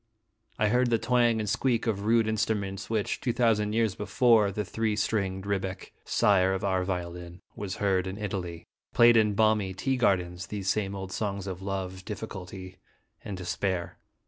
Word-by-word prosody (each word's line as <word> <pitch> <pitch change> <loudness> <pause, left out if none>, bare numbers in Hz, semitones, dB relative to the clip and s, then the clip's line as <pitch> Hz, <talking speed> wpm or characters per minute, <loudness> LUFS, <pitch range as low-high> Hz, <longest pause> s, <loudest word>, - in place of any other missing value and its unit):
I 105 -1 +2
heard 125 +2 +3
the 115 - +3
twang 120 -1 +2
and 105 - -2
squeak 120 +3 +1
of 105 -3 -1
rude 115 0 +3
instruments, 105 -3 -1
which, 110 -3 -1
two 125 - 0
thousand 110 -3 +2
years 110 -3 +2
before 110 0 +3
the 105 +1 -3
three 110 +2 -1
stringed 100 -3 -1
rebec 95 -1 -3
(sire 95 -2 +3
of 95 - -4
our 95 -2 +1
violin) 90 -1 -5
was 100 -2 -4
heard 95 -2 +1
in 95 +1 -5
Italy, 95 -5 -4 0.3
played 120 -1 +7
in 105 -2 +3
balmy 105 -3 +2
tea 130 +6 0
gardens 90 -6 0
these 100 -2 -3
same 100 -1 0
old 95 -1 -6
songs 100 -1 -3
of 95 -1 -5
love, 95 -1 -4
difficulty, 95 -3 -7 0.5
and 100 -3 -5
despair. 90 -1 -3
100 Hz, 170 wpm, -28 LUFS, 95-110 Hz, 0.5 s, played